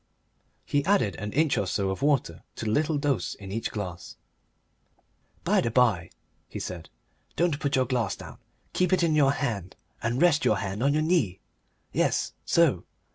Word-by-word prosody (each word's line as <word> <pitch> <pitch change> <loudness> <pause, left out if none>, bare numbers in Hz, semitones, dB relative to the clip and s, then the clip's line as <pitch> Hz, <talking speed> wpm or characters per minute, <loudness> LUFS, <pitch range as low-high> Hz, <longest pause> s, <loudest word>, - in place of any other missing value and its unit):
He 145 0 +1
added 170 - +2
an 105 +2 -5
inch 155 +2 +2
or 100 - -1
so 95 -1 0
of 95 - -5
water 145 -1 +1
to - - -5
the 105 - 0
little 150 +5 +1
dose 140 - -1
in 95 -1 -10
each 115 +3 -2
glass. 90 -5 -6 1.3
"By - - +3
the 115 - 0
by," 110 -9 +2 0.4
he - - -7
said, 85 -5 -6 0.5
"don't 165 -4 +1
put 140 -2 0
your 130 -1 +3
glass 120 -4 -1
down. - - -11 0.3
Keep 180 0 +2
it 185 - +3
in 165 -2 +3
your 140 -2 +4
hand 105 -11 -3 0.3
and 120 +3 -1
rest 170 -3 +4
your 105 - +3
hand 100 +2 -4
on 140 +2 +3
your 155 +1 +1
knee. 145 - +1 0.5
Yes - - +1
so. - - +3
125 Hz, 180 wpm, -27 LUFS, 100-145 Hz, 1.3 s, your